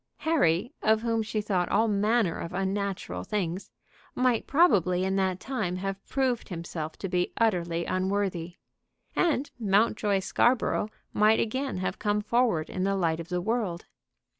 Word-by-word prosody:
Harry, 240 - +1
of 220 +1 +3
whom 230 -1 +1
she 215 0 -2
thought 185 -4 0
all 225 - +3
manner 210 -2 +1
of 170 - -6
unnatural 195 - -2
things, 185 - -3 0.5
might 250 -3 +1
probably 185 - +3
in 190 0 0
that 190 -1 0
time 215 -9 -2
have 195 +1 -4
proved 260 -4 -1
himself 165 -3 -5
to 195 - -4
be 180 -1 0
utterly 170 -6 +1
unworthy. 185 -2 -1 0.6
And 295 -5 +1
Mountjoy 205 -1 +2
Scarborough 235 +1 +1 0.2
might 215 +1 +4
again 260 +1 -1
have 185 - -3
come 210 0 +1
forward 225 -7 +1
in 185 - -3
the 195 +1 +1
light 165 -4 0
of 170 - -7
the 180 -1 -1
world. 210 -4 -2
200 Hz, 150 wpm, -28 LUFS, 180-225 Hz, 0.6 s, might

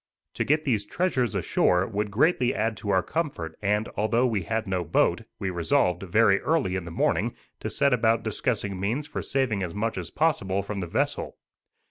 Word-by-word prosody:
To - - -1
get 150 +2 +1
these 110 -7 +1
treasures 130 - 0
ashore 90 +1 +2
would 105 0 -2
greatly 125 - +2
add 110 +1 0
to 105 - -6
our 95 -2 +3
comfort, 140 - -3
and, 105 +2 +1
although 115 +4 +2
we 110 -5 0
had 110 +5 -2
no 95 -3 -1
boat, 80 - +2 0.2
we 95 - -2
resolved, 90 0 +1
very 100 +1 +3
early 150 - +1
in 95 -2 -3
the - - -6
morning, - - 0 0.2
to - - -4
set 140 -2 +2
about 115 -1 +2
discussing 105 -3 -2
means 115 +10 -1
for - - -5
saving 130 -7 0
as 90 -1 -4
much 105 -1 -1
as 85 - -6
possible 100 -12 0
from 100 +1 -4
the 90 - -3
vessel. - - -1
105 Hz, 190 wpm, -26 LUFS, 95-125 Hz, 0.2 s, our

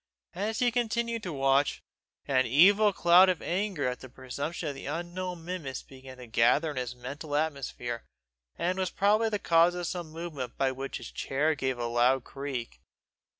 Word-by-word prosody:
As 210 +5 -2
he 250 -2 +2
continued 235 -1 -1
to 180 - -5
watch, 135 0 +2 0.4
an 130 -2 +2
evil 200 - +6
cloud 180 +1 +6
of 180 - +1
anger 185 -6 -1
at 125 0 -3
the 130 - -11
presumption 140 +6 -5
of - - -4
the 135 - -8
unknown 175 +2 -4
minimus 165 -7 -5
began 130 -1 -12
to 125 - -10
gather 120 +7 +3
in 145 - -8
his 125 -1 -3
mental 140 +4 -6
atmosphere, 140 -6 -2 0.5
and 180 +2 -1
was 185 -1 0
probably 210 +5 +2
the 210 - 0
cause 170 -1 +4
of 175 0 -3
some 175 -1 -4
movement 155 -7 -6
by 135 -1 +2
which 135 +1 -5
his - - -9
chair 150 +4 0
gave 130 -3 -2
a 120 - -2
loud 120 +2 +2
creak. 130 - -6
150 Hz, 180 wpm, -29 LUFS, 130-180 Hz, 0.5 s, evil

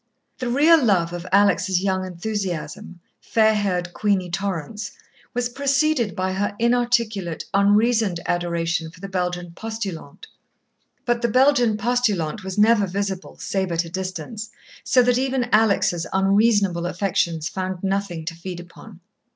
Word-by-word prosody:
The 250 -2 -2
real 300 +4 +5
love 175 -6 +2
of 175 +1 -6
Alex' 195 -2 +3
young 190 0 0
enthusiasm, 180 -3 -5 0.2
fair 220 -1 +3
haired 180 -4 -1
Queenie 195 -4 0
Torrance, 195 +2 -4 0.4
was 245 0 0
preceded 275 - +1
by 185 -1 -1
her 205 +1 -2
inarticulate, 235 -7 0
unreasoned 205 -1 +3
adoration 170 -1 -1
for 170 - -17
the 195 - -6
Belgian 180 -2 -3
postulante. 195 -7 -6 0.8
But 240 -1 +1
the 235 - +2
Belgian 245 -2 +3
postulante 215 -6 0
was 190 0 -6
never 210 -1 +4
visible, 195 0 -4
save 190 -2 -2
at 170 +1 0
a - - -8
distance, 190 +4 -5 0.3
so 250 - +4
that 245 0 +2
even 260 -2 0
Alex' 200 -6 +2
unreasonable 195 -2 +2
affections 170 -3 -1
found 185 -1 -4
nothing 195 -4 -2
to 165 - -3
feed 175 +1 -7
upon. 180 +2 -13
195 Hz, 135 wpm, -22 LUFS, 175-225 Hz, 0.8 s, real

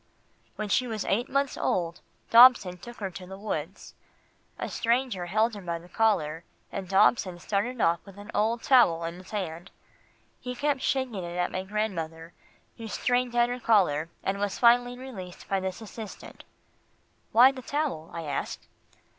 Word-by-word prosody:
"When 215 - -4
she 250 +5 +1
was 220 -3 -3
eight 235 +6 0
months 275 0 0
old, 170 -1 -1 0.3
Dobson 230 -7 +7
took 240 +5 -11
her 195 -3 -4
to 180 0 -9
the 190 +1 -8
woods. 190 -4 -5 0.6
A - - -3
stranger 235 -6 0
held 220 +5 +2
her 205 - -7
by 170 -2 -3
the 170 +1 -14
collar, 175 -7 +1 0.3
and 190 -2 -5
Dobson 190 -1 +3
started 210 +7 -2
off 170 -4 +3
with 195 -1 -14
an 205 +2 -10
old 225 +2 0
towel 175 -11 +5
in 165 0 -3
his 185 - -13
hand. 180 -4 -5 0.7
He 250 0 -6
kept 285 0 0
shaking 260 -3 0
it 175 0 -6
at 180 0 0
my 185 - -2
grandmother, 170 -5 -4 0.4
who 225 - -7
strained 245 +2 0
at 240 0 +4
her 245 +1 -3
collar, 180 -10 +2
and 195 +1 -1
was 205 -1 -2
finally 245 +1 +4
released 205 -9 -9
by 195 - 0
this 190 +2 -4
assistant." 220 -1 -10 0.9
"Why 250 +4 +7
the 265 -1 -9
towel?" 275 - -2
I 170 - -5
asked. 145 -3 -4
205 Hz, 170 wpm, -27 LUFS, 180-240 Hz, 0.9 s, Dobson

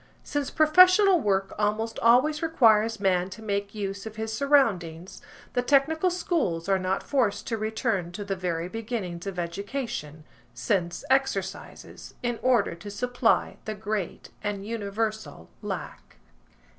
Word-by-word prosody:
Since 290 -2 -2
professional 365 +4 +6
work 195 -6 0
almost 215 +2 -1
always 255 +7 +4
requires 225 -9 +3
man 185 -2 +1
to 215 +4 -10
make 200 -1 -2
use 200 0 -4
of 220 - -9
his 220 0 -4
surroundings, 200 - +1 0.3
the 245 - +1
technical 290 +7 +3
schools 325 - -1
are 195 -1 +2
not 185 +1 -1
forced 230 -8 0
to 230 - -2
return 215 -4 -1
to 205 +2 -6
the 195 -1 -2
very 175 -2 -2
beginnings 205 -5 -5
of 195 -2 -5
education, 175 - -4 0.3
sense 175 +6 -1
exercises, 200 -8 -2
in 240 -1 -1
order 245 -8 +2
to 170 +5 -9
supply 245 +2 0
the 215 - -4
great 210 -3 -4
and 200 -1 -3
universal 215 - -4
lack. - - -7
215 Hz, 135 wpm, -26 LUFS, 190-245 Hz, 0.3 s, professional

